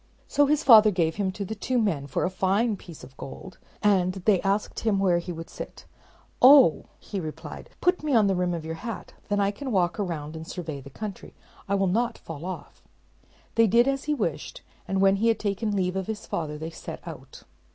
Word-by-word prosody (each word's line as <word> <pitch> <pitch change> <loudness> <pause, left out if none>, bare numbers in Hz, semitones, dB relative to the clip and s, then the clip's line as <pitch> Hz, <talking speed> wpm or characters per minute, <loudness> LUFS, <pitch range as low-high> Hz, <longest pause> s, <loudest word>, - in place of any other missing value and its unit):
So 290 -1 +3
his 300 +1 +2
father 220 -4 +8
gave 170 -4 0
him 195 -2 0
to 200 +1 -4
the 220 - -4
two 250 +4 -2
men 175 -12 0
for 135 - -1
a 185 - -1
fine 195 +4 +1
piece 170 -6 -12
of 130 +1 -13
gold; 180 +7 -9 0.2
and 185 -3 +3
they 190 0 +2
asked 200 +2 -1
him 220 -3 +1
where 185 -3 +3
he 175 +1 -6
would 165 -1 -7
sit. - - -9 0.6
"Oh," 255 - +7 0.3
replied 160 -6 -6
he, - - -28
"put 360 0 +2
me 300 -4 0
on 220 -2 +5
the 195 - +2
rim 180 -1 0
of 160 -2 -6
your 160 - -4
hat; 230 -2 -6
and - - -34
then 205 0 +1
I 200 0 +2
can 265 +5 -6
walk 180 -1 +1
round 160 -6 -3
and 160 0 -8
survey 160 -6 -6
the 140 - -11
country. 200 +6 -8 0.3
I 200 - +2
will 195 0 +2
not 230 +5 0
fall 165 0 -8
off." 185 0 -7 0.7
They 230 -1 +4
did 235 +5 +4
as 275 0 -1
he 300 0 +1
wished; 165 - -3 0.2
and 195 0 0
when 195 0 +5
he 225 +4 +1
had 225 -2 +3
taken 205 +1 -2
leave 185 -1 0
of 190 -1 -2
his 220 -1 -5
father, 150 -2 -3
they 160 +2 -6
set - - -9
out. - - -10
195 Hz, 225 wpm, -26 LUFS, 175-220 Hz, 0.7 s, father